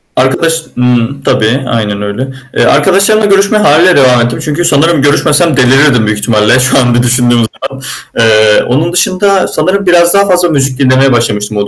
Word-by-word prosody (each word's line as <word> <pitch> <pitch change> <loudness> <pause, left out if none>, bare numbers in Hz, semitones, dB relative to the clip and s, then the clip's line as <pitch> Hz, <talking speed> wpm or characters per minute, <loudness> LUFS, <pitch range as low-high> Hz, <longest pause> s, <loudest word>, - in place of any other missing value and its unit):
Arkadaş 130 +6 0 0.2
ımm, 125 +2 -1
tabii. 130 +1 -1
Aynen 105 -4 -3
öyle. 105 +6 -5 0.2
Eee, - - +1
arkadaşlarımla 195 +8 +1
görüşmeye 200 +1 +1
hâliyle 180 -2 +3
devam 125 -3 +3
ettim 120 0 -3
çünkü 155 +3 -3
sanırım 160 0 +1
görüşmesem 150 +2 +1
delirirdim 125 -2 +2
büyük 105 0 -2
ihtimalle 110 +2 +1
şu 130 +1 +1
an 120 -2 0
bir 120 - +1
düşündüğüm 120 0 +1 0.2
zaman. 135 0 -7 0.4
Eee, 110 -1 +2
onun 155 +7 -2
dışında 185 +2 0
sanırım 195 +2 -2
biraz 175 -1 +3
daha 200 0 +2
fazla 180 -2 +1
müzik 135 -3 -2
dinlemeye 130 0 +2
başlamıştım 105 -3 -2
o 100 0 -2
135 Hz, 170 wpm, -8 LUFS, 120-170 Hz, 0.4 s, hâliyle